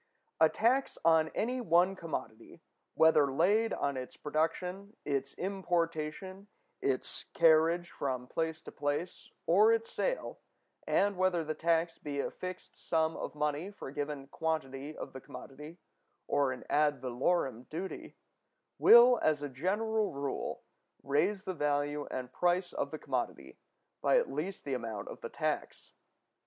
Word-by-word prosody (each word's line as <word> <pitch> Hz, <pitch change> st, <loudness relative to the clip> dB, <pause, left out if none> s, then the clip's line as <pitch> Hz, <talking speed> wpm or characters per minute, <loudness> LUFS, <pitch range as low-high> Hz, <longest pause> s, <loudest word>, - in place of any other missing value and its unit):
A 160 Hz, 0 st, +6 dB
tax 255 Hz, +9 st, +1 dB
on 160 Hz, -1 st, +5 dB
any 250 Hz, +3 st, -1 dB
one 180 Hz, -2 st, +3 dB
commodity, 115 Hz, -10 st, -7 dB, 0.3 s
whether 155 Hz, -3 st, +5 dB
laid 205 Hz, +10 st, +3 dB
on 140 Hz, -1 st, -1 dB
its 130 Hz, 0 st, -7 dB
production, 180 Hz, +7 st, -2 dB
its 140 Hz, -1 st, -2 dB
importation, 180 Hz, 0 st, -2 dB, 0.3 s
its 130 Hz, -2 st, -1 dB
carriage 165 Hz, +1 st, +4 dB
from 130 Hz, -3 st, -3 dB
place 160 Hz, +4 st, -3 dB
to -, -, -9 dB
place, 145 Hz, +5 st, -3 dB, 0.2 s
or 205 Hz, +6 st, +6 dB
its 230 Hz, 0 st, 0 dB
sale, -, -, -2 dB, 0.5 s
and 200 Hz, -1 st, +2 dB
whether 185 Hz, -2 st, +2 dB
the 155 Hz, 0 st, -3 dB
tax 165 Hz, +1 st, 0 dB
be 145 Hz, -1 st, -4 dB
a -, -, -1 dB
fixed 185 Hz, 0 st, -8 dB
sum 160 Hz, 0 st, 0 dB
of -, -, -5 dB
money 150 Hz, +4 st, -1 dB
for 200 Hz, -9 st, -9 dB
a -, -, -11 dB
given 145 Hz, -1 st, -4 dB
quantity 145 Hz, -1 st, -3 dB
of 135 Hz, -, -7 dB
the 130 Hz, -, -8 dB
commodity, 150 Hz, +7 st, -10 dB, 0.5 s
or 140 Hz, -2 st, +1 dB
an 130 Hz, -, -6 dB
ad 145 Hz, -2 st, +2 dB
valorem 130 Hz, 0 st, -1 dB
duty, 180 Hz, +5 st, -6 dB, 0.6 s
will, 240 Hz, +1 st, +8 dB
as 150 Hz, -2 st, +2 dB
a 145 Hz, -, -3 dB
general 210 Hz, -, 0 dB
rule, 140 Hz, 0 st, -4 dB, 0.4 s
raise 190 Hz, +8 st, +1 dB
the 185 Hz, -, -3 dB
value 145 Hz, -1 st, -1 dB
and 125 Hz, -1 st, -5 dB
price 180 Hz, +1 st, +1 dB
of -, -, -2 dB
the -, -, -5 dB
commodity -, -, -4 dB, 0.4 s
by -, -, +4 dB
at 485 Hz, -, +1 dB
least 185 Hz, +5 st, -4 dB
the 140 Hz, -, -2 dB
amount 115 Hz, -5 st, -4 dB
of -, -, -9 dB
the -, -, -5 dB
tax. -, -, -3 dB
160 Hz, 145 wpm, -32 LUFS, 145-185 Hz, 0.6 s, will